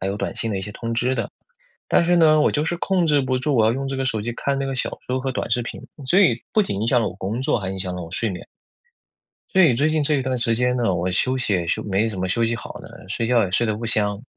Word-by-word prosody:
还 95 - -2
有 100 - -2
短 - - -3
信 115 - -2
的 95 - -1
一 - - -5
些 105 - -5
通 115 +2 -4
知 125 +3 +1
的。 115 -4 -3 0.6
但 - - +4
是 175 +1 +3
呢， 155 -2 +5
我 - - +4
就 150 +1 0
是 175 +1 -1
控 180 -1 +1
制 145 -2 +3
不 130 -1 0
住， 135 +2 0
我 110 - +4
要 110 - +3
用 135 +2 -3
这 135 - -3
个 135 - -1
手 110 -4 -1
机 120 +2 -3
看 140 +3 -2
那 135 - -1
个 135 - -3
小 - - -3
说 130 +1 -1
和 135 0 -2
短 - - -3
视 120 +1 +1
频。 - - -7 0.2
所 185 +8 +4
以 125 - +3
不 215 - +4
仅 100 - -3
影 110 - 0
响 120 0 +3
了 110 - 0
我 90 - -9
工 105 +6 -3
作， 125 - +1
还 95 -2 -4
影 95 - -5
响 90 -1 -3
了 90 - -5
我 80 - -9
睡 110 +2 -1
眠。 90 - -7 1.1
所 190 - +5
以 155 -9 +6
最 145 +6 +2
近 155 -1 +1
这 150 - +2
一 135 - +1
段 130 -1 -1
时 115 -1 +2
间 125 +1 +1
呢， 115 -6 +1
我 90 +1 -1
休 130 +8 +1
息 110 -5 0
也 85 -2 0
休 - - -1
没 105 +2 0
怎 100 -4 -5
么 95 - -1
休 115 +5 +1
息 115 - 0
好 - - -7
的， - - -13
睡 115 +3 -2
觉 120 -2 +3
也 95 - -4
睡 115 +6 +1
得 110 - 0
不 115 - -6
香， 105 -2 0
120 Hz, 340 characters per minute, -22 LUFS, 105-135 Hz, 1.1 s, 以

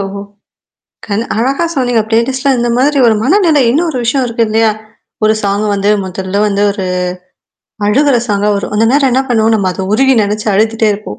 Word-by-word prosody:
ஓஹோ! 195 0 -5 0.9
கண் 210 +1 -2
அழகா 270 +8 0
சொன்னீங்க. 245 -4 +1
ப்ளேலிஸ்ட்ல 255 +4 0
இந்த 240 0 0
மாதிரி 280 +3 +1
ஒரு 225 - +3
மனநிலை 320 - +3
இன்னொரு 315 +2 0
விஷயம் 255 +3 0
இருக்கு 230 -1 0
இல்லையா? 220 +1 +2 0.5
ஒரு 215 0 +3
சாங் 200 +1 -1
வந்து 200 +1 0
முதல்ல 190 +2 -3
வந்து 200 -1 0
ஒரு 200 -2 -4 1.0
அழுகுற 275 +5 +2
சாங்கா 205 0 0
வரும். 200 - -5
அந்த 225 +2 +2
நேரம் 275 -1 +2
என்ன 260 +2 +2
பண்ணுவோம் 225 -2 +2
நம்ம 200 -4 0
அத 190 +1 -5
உருகி 265 +4 +3
நெனச்சு 210 +1 -2
அழுதிட்டே 220 +2 +1
இருப்போம். 200 - -8
225 Hz, 170 wpm, -12 LUFS, 205-265 Hz, 1.0 s, ஒரு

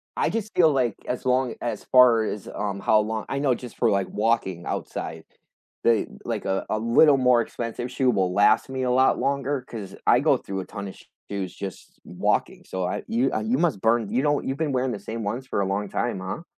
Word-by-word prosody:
I - - +1
just 220 -1 -3
feel 160 -3 +5
like 125 -5 +1
as 125 - -3
long 125 -1 +1
as 120 - -3
far 125 -3 +6
as, 105 -2 -4
um, 100 -1 -3
how 110 +2 +4
long 110 0 -2
I 135 - -1
know 135 -4 +2
just 125 -1 -10
for, 115 - +3
like, 100 -2 +1
walking 105 -5 0
outside, - - -5 0.6
the 115 -2 +3 0.2
like - - -3
a 95 0 -1
a 110 - 0
little 135 +6 +5
more 125 -2 +4
expensive 120 +2 -5
shoe 130 0 +1
will 95 -3 0
last 105 +5 +4
me 130 -1 -3
a 125 - +1
lot 130 +1 +3
longer 140 0 -1
'cause 100 -5 -8
I - - +6
go - - +4
through 95 -1 -5
a - - -8
ton 100 -2 -7
of 95 - -10 0.3
shoes 100 -2 -4
just 95 -2 -8
walking, - - -1
so 95 -1 -3
I - - -3
you, 125 +4 +1
uh, - - 0
you 115 +4 0
must 155 - +1
burn 115 -2 +2
you 125 +6 0
know, 145 -1 +2
you've 135 - -3
been 155 -3 -1
wearing 130 0 0
the 100 - -5
same 110 +2 -6
ones 120 +6 -3
for 115 - -2
a - - +1
long 100 +1 -2
time, 120 -5 -2
huh? 95 - -5
115 Hz, 230 wpm, -25 LUFS, 100-130 Hz, 0.6 s, far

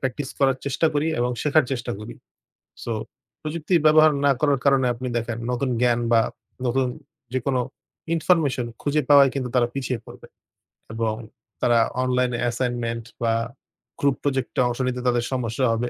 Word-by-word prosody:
Practice 130 +1 -3
করার 135 -1 +4
চেষ্টা 140 +4 +1
করি 145 +2 +1
এবং 125 +1 +1
শেখার 150 0 +4
চেষ্টা 120 -3 -3
করি। 105 - -8 0.7
So 115 - -2 0.5
প্রযুক্তির 160 +2 0
ব্যবহার 155 0 +7
না 140 - +6
করার 145 -3 +3
কারণে 135 -2 +4
আপনি 125 +2 -5
দেখেন 115 0 -4
নতুন 125 +1 -1
জ্ঞান 120 -1 +3
বা 115 - +6 0.5
নতুন 130 +1 +1 0.5
যেকোনো 130 0 0 0.5
ইনফরমেশন 155 -7 +2 0.2
খুঁজে 150 +1 +1
পাওয়ায় 140 -2 +7
কিন্তু 130 -2 -2
তারা 120 -1 +4
পিছিয়ে 130 -3 -2
পড়বে। - - -12 0.7
এবং 115 -1 -1 0.5
তারা 120 -1 +4 0.2
অনলাইন 125 0 +1
অ্যাসাইনমেন্ট 120 -1 -1 0.2
বা 115 -1 +2 0.7
গ্রুপ 140 -2 +2
প্রজেক্টে 135 -3 -1
অংশ 120 +1 -3
নিতে 125 0 -2
তাদের 120 -1 +2
সমস্যা 125 0 -1
হবে 120 +2 -1
130 Hz, 150 wpm, -23 LUFS, 120-140 Hz, 0.7 s, ব্যবহার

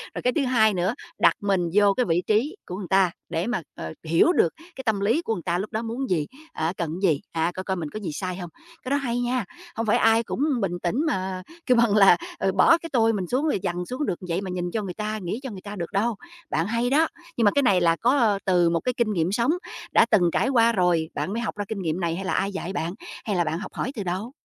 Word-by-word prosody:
Rồi - - -3
cái 250 - +1
thứ 285 -4 +1
2 220 -4 +4
nữa, 185 +5 0 0.3
đặt - - +5
mình 190 -4 +1
vô 205 -1 +5
cái 250 - +1
vị 170 0 +1
trí 240 - +1
của 180 - -5
người 190 -2 -6
ta 190 -2 +3 0.2
để 165 +5 -1
mà, 240 -6 -1
ờ, 80 0 -6
hiểu 165 - +4
được - - +3 0.2
cái 265 - -7
tâm 220 -3 +1
lý 225 +11 +2
của 225 - -2
người 180 - -4
ta 175 - 0
lúc 195 +4 -4
đó 220 - -1
muốn 235 +4 -4
gì, 155 -5 +1 0.3
á, 160 +3 -1
cần 170 -3 -2
cái 190 - +4
gì, 145 - -1
à, 165 +1 0
coi 185 - -4
coi 190 0 -1
mình 160 -4 -4
có 215 - -6
gì 185 -7 -4
sai 185 +3 -3
hông? 175 -2 -6 0.3
Cái 255 - -5
đó 280 - +2
hay 245 -4 -1
nha, 245 -3 0 0.3
không 225 - -2
phải 215 - +3
ai 225 +1 +4
cũng - - -5 0.2
bình 175 -3 -1
tĩnh 175 +5 0
mà 190 -8 -2 0.2
kêu 250 - +4
bằng 230 -3 +4
là, 195 -4 +7 0.2
ờ, 195 - +1
bỏ 330 - +5
cái 335 0 -8
tôi 225 -2 +4
mình 190 -4 -2
xuống, 260 - 0
rồi 295 - +1
dằn 180 -1 -2
xuống 255 +9 -3
được 175 - -2
vậy 170 +3 0
mà 195 - -5
nhìn 175 -1 -3
cho 220 - -1
người 185 -3 -5
ta, 215 +1 -3
nghĩ 185 +7 -3
cho 260 - -5
người 190 - -8
ta 205 +1 -7
được 170 -4 -5
đâu. 220 +3 +1 0.3
Bạn 165 +4 0
hay 235 +3 0
đó, 310 +5 +4 0.3
nhưng 230 - +3
mà 205 - +6
cái 285 - +2
này 190 -7 +4
là 165 -1 +4
có, 250 +10 +2
ờ, 215 -6 +3
từ 175 -3 +4
một 170 0 +1
cái 250 - -1
kinh 225 -3 +1
nghiệm 170 0 0
sống 235 +7 +2 0.4
đã - - +6
từng 180 -6 +5
trải 260 - +2
qua 235 -3 +4
rồi, 175 -6 +1
bạn 195 - -2
mới 230 - -2
học 225 - -3
ra 205 - -2
kinh 200 -2 -4
nghiệm 165 0 -1
này, 170 -2 -1
hay 190 - -5
là - - -1
ai 195 +1 0
dạy 190 0 -5
bạn, 170 +1 -2 0.3
hay 205 - -1
là 175 - +2
bạn 160 +2 -2
học 205 - -8
hỏi 255 - -3
từ 205 - -3
đâu? 190 +6 -3
200 Hz, 285 wpm, -25 LUFS, 175-235 Hz, 0.4 s, là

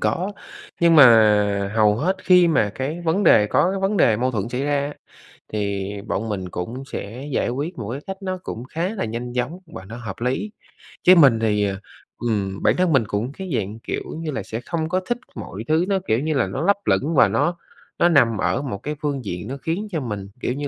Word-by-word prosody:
có, 190 +4 -1 0.5
nhưng 170 -1 +5
mà 105 -6 +6
hầu 105 -2 +4
hết 185 +9 0
khi 180 -2 +6
mà 110 -10 +2
cái 145 +6 -3
vấn 175 +5 +1
đề 105 -9 +6
có 180 - +2
cái 195 - -3
vấn 195 +2 0
đề 110 - +4
mâu 125 +3 0
thuẫn 110 -2 -2
xảy 125 +2 -3
ra 145 -1 +1
á, 145 - -7 0.6
thì 100 -2 -2 0.2
bọn 110 +2 -2
mình 95 -3 -4
cũng 115 +11 -5
sẽ 120 +8 -6
giải 125 - 0
quyết 145 +8 -4
một 110 -2 -5
cái 135 +3 -5
cách 195 - -5
nó 185 -1 -3
cũng 115 - -6
khá 165 +7 -3
là - - -2
nhanh 120 +2 -5
chóng 125 +9 -2
và 125 - -10
nó 115 +4 -8
hợp 110 -5 -6
lý. 130 - -1 0.5
Chứ 185 - +8
mình 135 -9 +6
thì, 105 -2 +1
à, 100 -1 -3 0.5
ừm, 100 -4 -2
bản - - +4
thân 180 -2 +2
mình 135 -4 +4
cũng 115 +4 -2
cái 190 +5 -8
dạng, 105 +1 -3
kiểu - - -4 0.2
như 160 -2 -3
là, 130 -7 -4
sẽ 110 +3 -5
không 160 -2 -2
có 185 +1 +1
thích 240 - +1 0.2
mọi 100 +3 -7
thứ, 160 +3 +2
nó, 195 -1 +1
kiểu 110 - +2
như 155 +3 -1
là, 125 -8 +1
nó 95 - -4
lấp 200 +1 +4
lửng 160 +4 +1
và - - +6
nó 170 0 0 0.4
nó 175 - +5
nằm 120 -9 +4
ở 90 +8 0
một 130 -8 -4
cái 150 +1 -3
phương 140 -5 -2
diện 90 -3 -5
nó 135 +2 -5
khiến 170 +9 -3
cho 165 - -1
mình, 105 -6 -5
kiểu 125 - -1
như 145 +2 -4
130 Hz, 235 wpm, -22 LUFS, 105-165 Hz, 0.6 s, Chứ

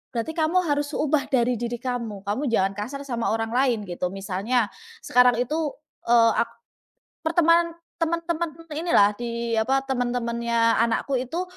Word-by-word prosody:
berarti 235 +7 -2
kamu 330 +3 +1
harus 290 -2 -1
ubah 300 -1 +1
dari 245 -2 +1
diri 240 0 -2
kamu, 235 -5 -4
kamu 210 +8 -2
jangan 195 -5 +2
kasar 255 +7 -5
sama 240 -6 -2
orang 225 0 -3
lain," 245 -3 +1
gitu. 180 -1 -3
Misalnya 200 +4 -1 0.3
sekarang 250 -1 +5
itu, 300 +5 -1 0.4
eee, 230 -1 +6
ak - - -1 0.7
pertemanan 335 +1 +3 0.3
teman-teman 335 0 -1 0.2
inilah 300 -10 +4
di 235 -1 -2
apa, 265 +4 +1
teman-temannya 235 -3 0
anakku 235 +3 +1
itu 275 +9 -3
245 Hz, 140 wpm, -24 LUFS, 230-295 Hz, 0.7 s, eee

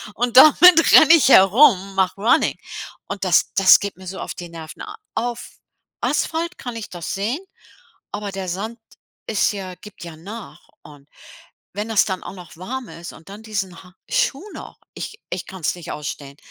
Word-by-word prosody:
Und 245 +1 -2
damit 330 +4 +7
renne 315 +1 +8
ich 310 -5 +5
herum, 195 -2 +5
mache 190 0 0
runnning. 225 - +2 0.5
Und 200 - -6
das 180 - +2
das 195 -1 +7
geht 200 -1 -5
mir 190 - -13
so 190 - -7
auf - - -6
die 175 -1 -9
Nerven. 160 -2 -10 0.3
Auf 240 +1 -4 0.5
Asphalt 335 +2 -2
kann 245 -2 -7
ich 225 -2 -7
das 175 -2 -6
sehen, 215 +9 -2 0.7
aber 205 -1 -5
der 190 -1 -6
Sand 215 +6 -5 0.5
ist 215 -1 +1
ja 190 -3 -7
gibt 190 0 -13
ja 165 -2 -10
nach 205 +7 -11
und 145 -1 -16 0.7
wenn 210 +3 -5
das 220 -3 +3
dann 190 -2 -4
auch - - -8
noch 180 -4 -13
warm 245 +8 -6
ist 170 +1 -10
und 165 +4 -16
dann 205 +2 -10
diesen 195 -5 -5
ha 180 -1 -18 0.2
Schuh - - 0
noch, - - -11 0.2
ich 420 - -8
ich 180 - -4
kann's 185 -4 -3
nicht 175 -3 -9
ausstehen. 140 -1 -7
195 Hz, 180 wpm, -20 LUFS, 180-240 Hz, 0.7 s, renne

